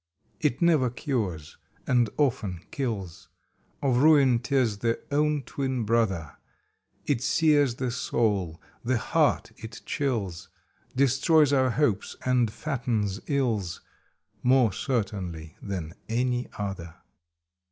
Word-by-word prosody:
It 120 - 0
never 155 -7 +4
cures 110 - -3 0.3
and 120 -3 +3
often 115 - 0
kills; 110 - -4 0.6
Of 130 -3 +2
Ruin 140 -4 +5
tis 120 -4 0
the 115 +1 0
own 150 0 +1
twin 130 -1 -2
brother; 105 -8 0 0.7
It 135 -5 0
sears 145 -2 +3
the 125 -1 -2
soul, 105 -9 -1 0.2
the 125 +1 +1
heart - - +1
it 110 +1 -9
chills, 110 - -2 0.5
Destroys 140 +3 +4
our 130 -2 +3
hopes 115 -6 0
and 125 -3 +3
fattens 115 -8 -2
ills, 115 - -1 0.6
More 125 -4 +4
certainly 95 - -3
than 90 -5 -5 0.2
any 125 +1 0
other. 95 -5 -5
120 Hz, 110 wpm, -27 LUFS, 100-135 Hz, 0.7 s, Ruin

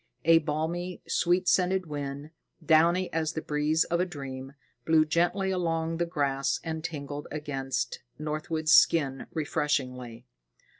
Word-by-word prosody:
A 165 0 +7
balmy, 165 +4 -3
sweet 180 +1 +1
scented 185 0 +2
wind, 145 0 -6 0.3
downy 170 +4 +3
as 160 0 -1
the 160 - -3
breeze 150 +2 +1
of 170 - -1
a 180 - +2
dream, 135 -4 -7 0.3
blew 155 +3 +4
gently 175 +4 +1
along 165 -2 -1
the 170 0 0
grass 140 -5 0
and 160 -1 -4
tingled 145 -3 -5
against 135 -4 -3 0.2
Northwood's 155 +1 -2
skin 140 -6 +4
refreshingly. 130 -6 -2
155 Hz, 130 wpm, -28 LUFS, 145-170 Hz, 0.3 s, A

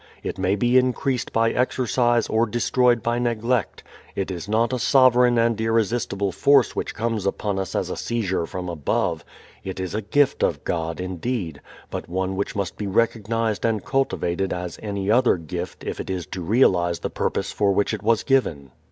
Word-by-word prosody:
It - - -4
may 95 +1 +2
be 120 +5 +4
increased 130 0 -1
by 115 0 +2
exercise 120 -2 +1
or 115 +1 +2
destroyed 120 +1 +2
by 120 +1 0
neglect. 120 -1 -1 0.3
It 95 -1 -2
is 90 +2 -6
not 115 +3 +1
a 125 - -1
sovereign 125 -2 +5
and 115 -1 +2
irresistible 110 -3 0
force 140 +4 +3
which - - -3
comes 115 -3 -1
upon 100 0 -1
us 95 - -4
as - - -1
a - - -3
seizure 95 -8 -2
from 90 +1 -5
above. 85 -5 -1 0.4
It 95 -1 -6
is 95 -1 -4
a 110 - -1
gift 140 +7 +2
of - - 0
God, 80 -1 -2
indeed, 90 - -3 0.3
but - - -5
one 95 +2 -2
which 100 +1 -3
must 100 -3 -3
be 105 - -3
recognized 115 +1 0
and 110 -3 0
cultivated 95 -9 0
as 90 -1 -5
any 100 -1 -2
other 120 -3 +4
gift 85 +2 -6
if - - -5
it - - -5
is 90 -3 -3
to 95 - -6
realize 85 -4 +2
the - - -3
purpose - - -2
for 100 -1 +1
which 100 +3 +1
it 105 - -3
was 110 +1 +2
given. 80 - 0
110 Hz, 185 wpm, -23 LUFS, 95-120 Hz, 0.4 s, sovereign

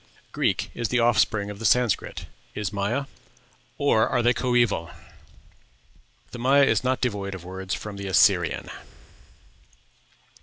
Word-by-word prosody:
Greek - - -1
is 120 - -2
the 125 - 0
offspring 110 -3 +2
of 100 - -10
the - - -8
Sanscrit. 120 +1 +1 0.3
Is 105 -1 -3
Maya? 105 +8 -1 0.7
or 115 -6 +2
are 120 - 0
they 120 +1 +4
coeval?... 120 -9 +1 1.4
The 120 - -8
Maya 135 +3 +4
is 115 -5 +2
not 130 0 0
devoid 100 -5 -2
of 90 -2 -10
words 95 +1 -5
from 105 -2 -8
the 100 0 -6
Assyrian." 95 - +2
110 Hz, 130 wpm, -24 LUFS, 100-125 Hz, 1.4 s, they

